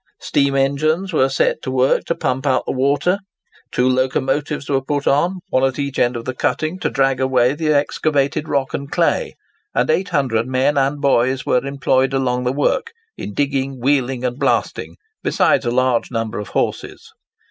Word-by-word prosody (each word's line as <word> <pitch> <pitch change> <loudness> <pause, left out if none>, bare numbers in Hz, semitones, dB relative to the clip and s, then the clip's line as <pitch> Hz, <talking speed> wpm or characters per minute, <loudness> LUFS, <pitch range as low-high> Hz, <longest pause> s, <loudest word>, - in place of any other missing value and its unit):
Steam 140 -1 +1
engines 155 +7 +1
were 135 -3 +3
set 135 - 0
to - - -5
work 130 +1 +2
to 170 - -1
pump 130 +2 -2
out 130 -2 +2
the - - -2
water; 140 +8 +1 0.5
two 125 - +1
locomotives 135 +3 0
were 135 -1 +1
put 145 +1 -2
on, 175 +6 +1
one 130 - +1
at 135 -1 +1
each 140 -2 -3
end 120 0 +2
of 115 - -5
the 130 - -3
cutting, 155 +7 -1
to - - -1
drag 135 -1 +1
away 130 -1 +2
the 155 +1 -1
excavated 145 0 0
rock 135 -2 -1
and 140 0 -4
clay; - - 0 0.4
and - - +2
800 135 -9 0
men 130 +3 +1
and 140 +1 +1
boys 130 -1 +2
were 125 - +2
employed 135 -1 +1
along 125 -2 0
the 125 - +1
work, 260 - 0 0.2
in 105 - -7
digging, 135 -2 -1
wheeling, 130 -1 0
and 125 +2 -3
blasting, - - -1 0.3
besides 120 - +2
a - - +2
large 130 -1 +1
number 115 -2 -3
of 105 - -6
horses. - - -3
135 Hz, 180 wpm, -19 LUFS, 130-145 Hz, 0.5 s, were